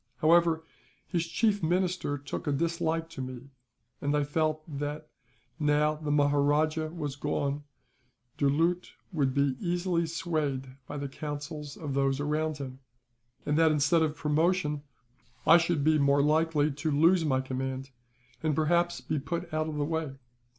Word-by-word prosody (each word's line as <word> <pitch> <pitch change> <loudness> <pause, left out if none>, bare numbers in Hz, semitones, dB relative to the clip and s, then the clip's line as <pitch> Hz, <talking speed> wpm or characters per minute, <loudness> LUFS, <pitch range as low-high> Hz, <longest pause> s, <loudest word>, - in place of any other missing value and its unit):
However, 165 0 +4 0.4
his 170 -2 -1
chief 205 +4 +1
minister 175 -3 0
took 145 +2 -6
a - - +2
dislike 165 +2 0
to 135 - -6
me; 130 +1 -7 0.5
and 145 +1 +1
I 145 - +2
felt 155 +1 0 0.2
that, 150 +1 -4 0.5
now 150 0 +3
the 155 -1 -5
Maharajah 145 +2 +2
was 150 -4 -4
gone, 145 0 -2 0.7
Doulut 165 +6 +1 0.2
would 140 -6 0
be 140 -2 +2
easily 175 -1 0
swayed 155 -6 -2 0.2
by 145 - -5
the 140 0 -3
counsels 145 +1 -6
of 145 -4 -4
those 135 0 +1
around 155 +1 -1
him; 130 -2 -7 0.7
and 150 +1 +1
that 160 -1 +5
instead 150 +3 +3
of 155 -1 +1
promotion 150 +1 +1 0.6
I 165 - +8
should 165 -3 0
be 155 0 +4
more 140 0 +4
likely 155 0 +2
to 150 +3 -3
lose 165 +4 +4
my 135 -4 +2
command, 130 0 -4 0.5
and 155 -2 +1
perhaps 170 +3 +1
be 155 - -2
put 170 +4 -4
out 155 0 0
of 155 - -5
the 145 -1 0
way. 160 -3 -2
150 Hz, 150 wpm, -29 LUFS, 145-165 Hz, 0.7 s, I